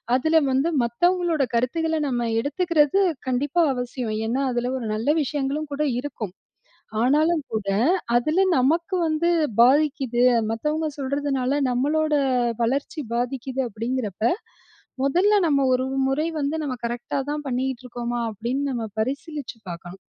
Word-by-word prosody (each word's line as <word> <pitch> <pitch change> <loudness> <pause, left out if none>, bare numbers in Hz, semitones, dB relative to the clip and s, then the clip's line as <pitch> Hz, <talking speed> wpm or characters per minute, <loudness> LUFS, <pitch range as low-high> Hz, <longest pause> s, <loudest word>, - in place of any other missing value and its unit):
அதில 315 +5 +3
வந்து 270 +5 +2
மத்தவங்களோட 340 +6 +1
கருத்துக்களை 320 +7 0
நம்ம 240 -3 -1
எடுத்துக்கிறது, 305 +4 +2 0.3
கண்டிப்பா 280 +6 +1
அவசியம். 245 -2 -3
ஏன்னா, 250 +4 0
அதில 240 0 -1
ஒரு 235 - -5
நல்ல 225 +6 -1
விஷயங்களும் 290 +2 -2
கூட 295 +2 -1 0.2
இருக்கும். 250 -8 -5 0.7
ஆனாலும் 305 +5 +3
கூட, 215 -3 -2 0.5
அதில 305 +9 +2 0.2
நமக்கு 330 +8 +1
வந்து 315 +2 +1 0.3
பாதிக்குது. 265 -1 +3 0.3
மத்தவங்க 300 +8 -1
சொல்றதுனால 280 -1 -1
நம்மளோட 300 +5 +1 0.5
வளர்ச்சி 275 +6 -1
பாதிக்குது 255 +2 -2
அப்படிங்கிறப்ப, 225 -2 -4 0.8
மொதல்ல 365 +10 +3
நம்ம 280 -3 +2
ஒரு 255 0 +2 0.2
முறை 275 +4 0
வந்து 290 +2 -1
நம்ம 270 -4 -2
கரெக்ட்டாதான் 270 +5 -3
பண்ணிகிட்டு 255 -1 -2
இருக்கோமா, 240 0 -3
அப்படின்னு 235 +6 -3
நம்ம 235 -3 -3
பரிசீலிச்சு 280 +1 -4
பாக்கணும். 175 +2 -9
270 Hz, 120 wpm, -24 LUFS, 240-305 Hz, 0.8 s, அதில